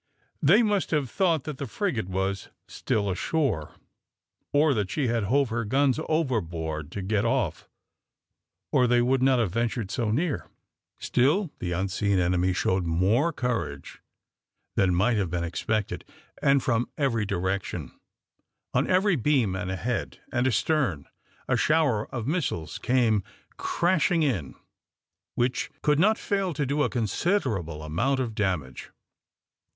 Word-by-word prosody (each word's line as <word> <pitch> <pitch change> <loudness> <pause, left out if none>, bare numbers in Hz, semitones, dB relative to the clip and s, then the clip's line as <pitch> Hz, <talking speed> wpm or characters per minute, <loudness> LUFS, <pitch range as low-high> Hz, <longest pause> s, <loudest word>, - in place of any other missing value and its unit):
They 200 +11 +6
must 205 -3 +1
have 145 -6 0
thought 170 -7 +1
that 150 -3 -6
the 140 - -3
frigate 120 - -2
was 95 +1 -2 0.2
still 100 -1 -1
ashore, 110 - -1 0.8
or 145 0 +4
that 105 -5 -1
she 125 +4 0
had 115 -3 0
hove 135 +4 +2
her 115 +1 -1
guns 135 +5 +2
overboard 85 - -1
to 100 - -4
get 105 +2 0
off, 115 - -1 1.0
or 125 - +4
they 120 0 +4
would 130 +1 +2
not 130 0 +4
have 115 -7 +1
ventured 115 -3 -1
so 115 -1 -1
near. 145 +7 -1 0.5
Still 150 +8 +2
the 90 -1 -2
unseen 95 +2 0
enemy 90 +1 +2
showed 90 -1 0
more 100 - +2
courage 115 - -3 0.7
than 90 -2 +3
might 110 +6 +2
have 95 -4 0
been 85 0 -2
expected, 105 +5 -2 0.4
and 140 -1 +3
from 120 -1 0
every 125 -7 +1
direction, 100 0 -2 0.8
on 125 +3 +1
each 185 - +3
beam 125 -9 +2
and 95 0 -3
ahead, 110 +6 -3
and 120 +1 +1
astern, 125 - +1 0.4
a - - +2
shower 150 -9 +2
of 120 -4 -4
missiles 140 - -2
came 120 -4 +2 0.4
crashing 170 -1 +1
in 100 - -1 0.8
which 125 +1 0
could 150 0 +3
not 215 +5 +4
fail 195 -5 -1
to 145 0 0
do 145 +3 0
a - - +2
considerable 110 - -1
amount 115 - 0
of 120 -4 -2
damage. 90 -11 -2
120 Hz, 140 wpm, -26 LUFS, 95-145 Hz, 1.0 s, They